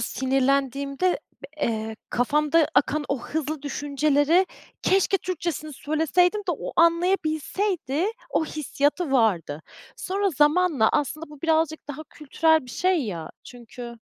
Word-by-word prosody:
sinirlendiğimde 275 +5 0 0.2
b - - -7 0.2
eee, 220 -1 -3
kafamda 300 +5 +2
akan 295 +1 +2
o 280 - 0
hızlı 310 -1 -3
düşünceleri 290 +4 +2 0.4
keşke 390 +1 +3
Türkçesini 335 -4 -4
söyleseydim 320 +8 +1
de 385 -4 -2
o - - -6
anlayabilseydi, 335 0 +1 0.2
o - - +1
hissiyatı 295 +1 -1
vardı. 175 - +1 0.3
Sonra 395 +1 -1
zamanla, 295 -4 +3
aslında 305 +3 -1
bu 295 -2 -13
birazcık 320 -2 0
daha 290 +2 -6
kültürel 315 +1 +1
bir - - -10
şey, 360 +3 +1
ya, 170 -5 -5
çünkü 240 0 -10
300 Hz, 120 wpm, -24 LUFS, 270-335 Hz, 0.4 s, keşke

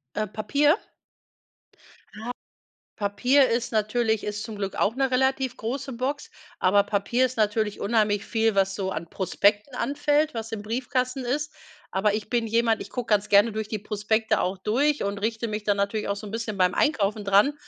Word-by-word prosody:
Äh, 215 +1 -1
Papier? 280 - +2 1.5
Ah. 230 - -5 0.7
Papier 245 +7 +3
ist 235 +1 -1
natürlich 220 0 +1
ist 210 +1 -4
zum 220 -2 -7
Glück 195 -1 -4
auch 205 +2 +1
'ne 265 0 0
relativ 265 0 +1
große 265 +4 -4
Box, 265 +4 -3 0.3
aber 200 +2 +4
Papier 205 +5 +1
ist 255 - -8
natürlich 215 -1 0
unheimlich 210 -1 +1
viel, 225 -1 +1
was 195 0 +2
so 190 -2 -2
an 170 -2 -5
Prospekten 205 +7 +1
anfällt, 295 +1 +1
was 225 -1 -5
im 215 -2 -4
Briefkasten 250 +3 -2
ist. 295 +4 -2 0.4
Aber 200 +2 +1
ich 215 0 -4
bin 235 -2 +1
jemand, 230 0 +2
ich - - -8
gucke 245 -3 -5
ganz 210 0 +2
gerne 205 +3 +5
durch 215 0 -4
die 215 - -3
Prospekte 210 +2 0
auch 185 +2 -1
durch 275 +10 +1
und 200 0 -2
richte 225 +2 -2
mich 210 0 -4
dann 205 -1 +2
natürlich 200 +1 -1
auch 200 - -1
so 210 - -8
'n - - -7
bisschen 225 -1 -4
beim 180 -1 +3
Einkaufen 215 -8 +1
dran. 200 +9 +4
220 Hz, 185 wpm, -25 LUFS, 205-250 Hz, 1.5 s, gerne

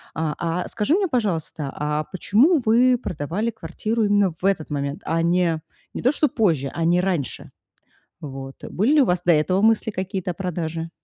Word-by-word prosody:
А, 160 -1 -1
а, 170 +1 -2
скажи 250 +10 +1
мне, 395 0 +1
пожалуйста, 170 - -2
а 150 +1 -2
почему 245 - +3
вы 245 +3 +4
продавали 180 - -3
квартиру 220 0 -3
именно 205 -3 +2
в - - -3
этот 195 -6 +1
момент, 140 0 -3
а, 165 +1 0
не 170 -1 +1 0.3
не - - -5
то, 255 - +3
что 300 - +2
позже, 160 - +1
а 165 - -1
не 175 +2 +3
раньше? 180 -8 -3 0.7
Вот. 135 -2 -7
Были 220 +10 +1
ли 300 - +6
у - - +4
вас 180 -4 0
до 175 - +5
этого 185 +5 +2
мысли 220 0 +3
какие-то 190 -1 -3
о - - -6
продаже? 165 -2 -4
180 Hz, 185 wpm, -23 LUFS, 160-220 Hz, 0.7 s, ли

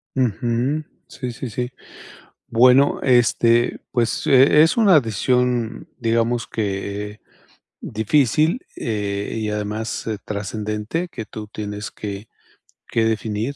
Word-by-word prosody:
Ujú. 125 +4 0 0.2
Sí, 125 -2 -6
sí, 120 +1 -6
sí. 125 +3 -3 0.8
Bueno, 125 +4 +5
este, 120 -1 +3
pues, 120 -2 0
e 135 +3 +6
es 165 +7 +4
una 200 -8 +6
decisión, 125 0 0
digamos 115 0 0
que 105 0 -4 0.6
difícil, 145 - +1 0.2
eh, 100 -2 -3
y 110 -1 -2
además 105 +2 -3 0.2
trascendente, 105 - -3
que 115 - -7
tú 110 -1 -8
tienes 105 0 -6
que 105 +1 -7 0.6
que 115 - +1
definir, 110 +3 -1
115 Hz, 105 wpm, -21 LUFS, 105-125 Hz, 0.8 s, e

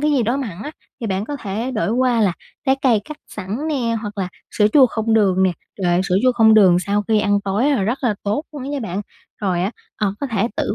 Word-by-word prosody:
cái 300 +1 +2
gì 270 -5 +2
đó 240 +5 0
mặn 210 -9 -5
á, 295 - -5 0.3
thì 230 - -3
bạn 195 +1 -1
có 290 +3 -5
thể 225 +3 -4
đổi 220 -4 -1
qua 245 -1 +2
là 195 -4 +3 0.3
trái 265 0 +4
cây 235 -6 +4
cắt 305 - -8
sẵn 215 +10 -4
nè 240 -6 0
hoặc 210 -2 -7
là 185 - -1 0.2
sữa 210 - +3
chua 270 -3 +7
không 225 -1 -1
đường 190 -4 +3
nè. 190 - +4 0.3
Trời 185 - -1
ơi, 175 +1 +3
sữa 185 -1 +1
chua 255 -1 +4
không 220 -2 +5
đường 190 -5 +6
sau 200 +3 0
khi 215 -1 +3
ăn 205 -1 +2
tối 205 +8 +1
là 260 -9 +1
rất 235 +7 0
là 225 -4 +2
tốt 210 +10 -1
luôn 290 -3 -7
á 270 - -5
nha 285 -1 -3
bạn. 200 -3 -3 0.4
Rồi 180 -3 0
á, 195 - 0 0.3
ờ, 200 -2 -1
có 280 - -1
thể 225 -3 0
tự 205 - -1
220 Hz, 270 wpm, -20 LUFS, 200-255 Hz, 0.4 s, chua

